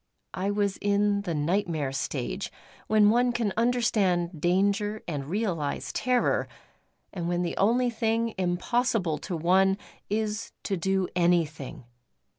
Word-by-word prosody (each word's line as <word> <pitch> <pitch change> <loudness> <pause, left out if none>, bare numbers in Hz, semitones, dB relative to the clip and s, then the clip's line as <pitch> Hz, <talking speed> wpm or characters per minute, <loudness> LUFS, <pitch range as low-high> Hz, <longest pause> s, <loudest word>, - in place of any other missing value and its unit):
I 190 +2 -1
was 205 -1 0
in 205 0 +1
the 175 -5 -3
nightmare 155 -2 0
stage, 135 - -3 0.4
when 215 -1 +5
one 245 +2 +3
can 230 -5 -1
understand 205 -8 +1
danger 200 +4 +1
and 145 -5 -4
realise 170 -6 -2
terror; 250 -1 +1 0.7
and 175 -3 -3
when 175 0 0
the 170 - -2
only 240 +5 +3
thing 230 0 0
impossible 185 - 0
to 180 -3 -4
one 190 +4 +3 0.3
is 215 +1 -2
to 200 - -1
do 190 +1 0
anything. 160 -5 0
195 Hz, 125 wpm, -27 LUFS, 170-215 Hz, 0.7 s, when